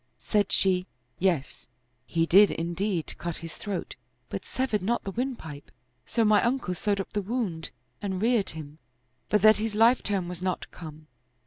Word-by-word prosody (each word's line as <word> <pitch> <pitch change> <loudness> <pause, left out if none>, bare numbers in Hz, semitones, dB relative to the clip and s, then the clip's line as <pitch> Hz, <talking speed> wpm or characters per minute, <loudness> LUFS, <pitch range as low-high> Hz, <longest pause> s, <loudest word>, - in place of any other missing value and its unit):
Said 205 -2 0
she, 185 -1 +2 0.2
" 120 0 -42
Yes, 150 -6 -4 0.4
he 165 0 +1
did 200 +5 +7
indeed 170 +1 -2
cut 170 -1 -3
his 165 -1 -7
throat, 200 -4 -5 0.3
but - - -5
severed 255 -5 -1
not 235 +6 0
the 195 - -4
windpipe; 195 - -4 0.4
so 230 -2 +2
my 210 -1 +5
uncle 240 -6 0
sewed 200 +3 0
up 195 - -5
the 205 - 0
wound 195 -6 -2 0.3
and 190 -3 -2
reared 225 -1 +2
him, 155 -1 -8 0.5
for 210 - +5
that 215 +2 +6
his 215 0 -2
life 230 +4 +5
term 195 -4 -1
was 180 0 -6
not 185 -1 -2
come." 155 -2 -10
195 Hz, 175 wpm, -27 LUFS, 170-215 Hz, 0.5 s, did